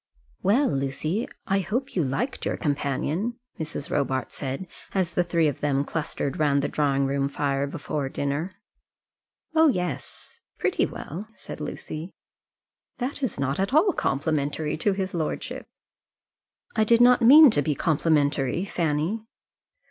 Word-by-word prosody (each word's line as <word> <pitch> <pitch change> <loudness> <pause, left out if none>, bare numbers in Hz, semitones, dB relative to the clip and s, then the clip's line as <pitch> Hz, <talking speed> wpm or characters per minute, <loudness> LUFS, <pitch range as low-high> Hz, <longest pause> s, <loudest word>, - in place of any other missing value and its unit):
"Well, 240 +9 +3
Lucy, 145 - -1 0.2
I 195 0 +2
hope 230 +9 -2
you 175 - +2
liked 145 - -2
your - - -1
companion," 150 - -1 0.2
Mrs. 160 0 -5
Robarts 130 -2 -1
said, 135 +5 -4 0.3
as 180 -3 +1
the 180 - +2
three 170 -2 +2
of 145 - -2
them 140 -1 +1
clustered 150 -3 -3
round 140 -2 +3
the - - +1
drawing 140 -2 +1
room 140 0 0
fire 140 -1 -1
before 145 -2 -3
dinner. 145 +7 -2 1.0
"Oh, 320 0 +6
yes; 180 - -3 0.2
pretty - - +1
well," 185 +8 -7
said - - -9
Lucy. 160 +4 -6 0.8
"That 265 +3 -3
is 260 - -2
not 140 +4 -1
at 195 +8 0
all 360 +5 +5
complimentary 150 +1 -1
to 195 +6 +1
his 190 -1 -3
lordship." 160 -3 -3 1.1
"I 220 - +4
did 230 +2 +4
not 245 +1 +6
mean 280 +4 +9
to 145 - +2
be 145 +1 0
complimentary, 150 0 +1
Fanny." 170 +5 -1
155 Hz, 140 wpm, -25 LUFS, 140-200 Hz, 1.1 s, mean